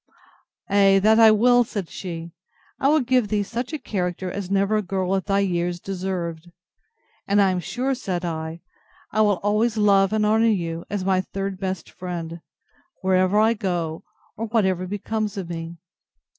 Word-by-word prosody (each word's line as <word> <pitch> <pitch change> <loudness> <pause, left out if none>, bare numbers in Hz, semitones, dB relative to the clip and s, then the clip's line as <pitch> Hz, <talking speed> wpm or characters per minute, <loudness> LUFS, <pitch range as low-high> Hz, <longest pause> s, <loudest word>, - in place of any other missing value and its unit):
Ay, 195 -1 +5
that 215 +3 +4
I 225 -1 +9
will, 245 +3 +5
said 200 -5 -5
she; 170 -2 -7 0.5
I 270 - +2
will 305 +1 +4
give 250 -2 +2
thee 205 -1 0
such 235 +6 -4
a 310 - -2
character 180 - -3
as 195 -1 -5
never 200 +2 +2
girl 190 -1 -1
at 190 - -2
thy 200 0 +2
years 175 -2 -1
deserved. 180 -3 -4 0.8
And 200 +1 +3
I 195 -2 +4
am 185 - -1
sure, 255 +9 -2
said 180 -8 -3
I, 160 0 -4 0.5
I 215 - +2
will 205 -3 +3
always 215 +2 +1
love 200 -2 +4
and 215 -1 +1
honour 220 +2 +3
you, 170 -5 -1
as 200 -3 -3
my 190 -1 +2
third 195 0 -5
best 190 -3 -3
friend, 170 -2 -6 0.6
wherever 185 +1 +3
I 220 +2 +4
go, 175 -5 -3 0.3
or 225 - -4
whatever 190 -5 +1
becomes 210 +1 -3
of 190 -3 -4
me. 165 0 -6
195 Hz, 170 wpm, -23 LUFS, 180-215 Hz, 0.8 s, I